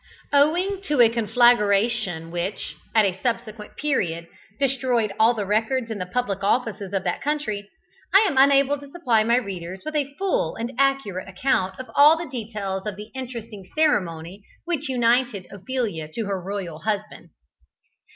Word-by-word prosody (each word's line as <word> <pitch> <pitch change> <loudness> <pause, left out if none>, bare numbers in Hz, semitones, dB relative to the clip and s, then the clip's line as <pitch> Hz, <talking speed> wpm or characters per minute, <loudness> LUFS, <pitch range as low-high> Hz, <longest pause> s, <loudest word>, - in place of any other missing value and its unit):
Owing 350 +7 +3
to 295 -3 0
a 235 -2 +8
conflagration 220 -6 +2
which, 175 +4 -4 0.2
at 220 -2 +6
a 190 -1 -2
subsequent 230 -3 -4
period, 175 - -1 0.3
destroyed 250 -6 +1
all 225 +2 +5
the 210 -2 -2
records 225 +4 0
in 215 - -4
the 180 - -4
public 200 -2 -2
offices 210 -3 0
of 195 -2 -1
that 175 - -2
country, 220 -9 -2 0.4
I 390 - +7
am 315 - -1
unable 275 +1 +4
to 285 0 -12
supply 250 -9 +1
my 235 +2 +3
readers 190 -6 -4
with 310 0 -4
a 285 -2 0
full 380 - 0
and 230 +2 -4
accurate 270 -10 +1
account 190 -1 0
of 260 - -8
all 300 +3 +7
the 335 0 -5
details 210 -5 -4
of 210 - -3
the 210 +2 -10
interesting 235 -7 -7
ceremony 190 - 0 0.2
which 310 -5 -2
united 240 -4 +1
Ophelia 200 -6 -3
to 225 - -3
her 195 -2 -2
royal 180 -4 -5
husband. 210 -4 -4
225 Hz, 160 wpm, -24 LUFS, 195-265 Hz, 0.4 s, a